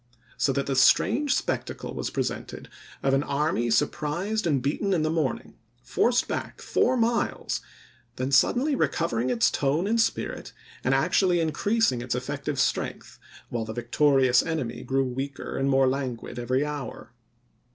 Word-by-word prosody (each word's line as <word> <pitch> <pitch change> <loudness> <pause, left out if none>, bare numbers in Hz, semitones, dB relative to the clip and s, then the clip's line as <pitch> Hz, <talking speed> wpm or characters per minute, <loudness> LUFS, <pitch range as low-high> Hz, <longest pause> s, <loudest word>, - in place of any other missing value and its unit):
So 140 - +1
that 140 0 -1
the 135 - -1
strange 250 - +4
spectacle - - -3
was - - -3
presented, - - -4 0.3
of 135 - +2
an 135 - +3
army 140 -4 0
sur 130 +6 +4
prised 175 +9 -2
and 145 -4 +2
beaten 150 +10 -1
in 165 -4 +1
the 155 - 0
morning, 155 -6 -2 0.2
forced 240 - +1
back - - -4
four 255 - +1
miles, 235 0 0 0.5
then 130 +2 -3
suddenly 250 - +3
recovering 130 - 0
its 120 -2 +2
tone 145 +6 0
and 225 +2 +2
spirit, - - -2 0.3
and 135 +2 +2
actually 175 +4 +2
increasing 165 - +1
its 120 0 -2
effective 140 +2 -3
strength, 125 - -2 0.3
while 120 -2 -2
the 110 0 -6
victorious 130 +1 +3
enemy 150 -8 -3
grew 135 0 0
weaker 135 +2 -5
and 135 +1 0
more 135 0 +4
lan 130 -2 -1
oct. - - -21
i9,i864. - - -9
guid - - -7
every 130 +4 0
hour. 145 -4 -6
140 Hz, 160 wpm, -26 LUFS, 130-170 Hz, 0.5 s, strange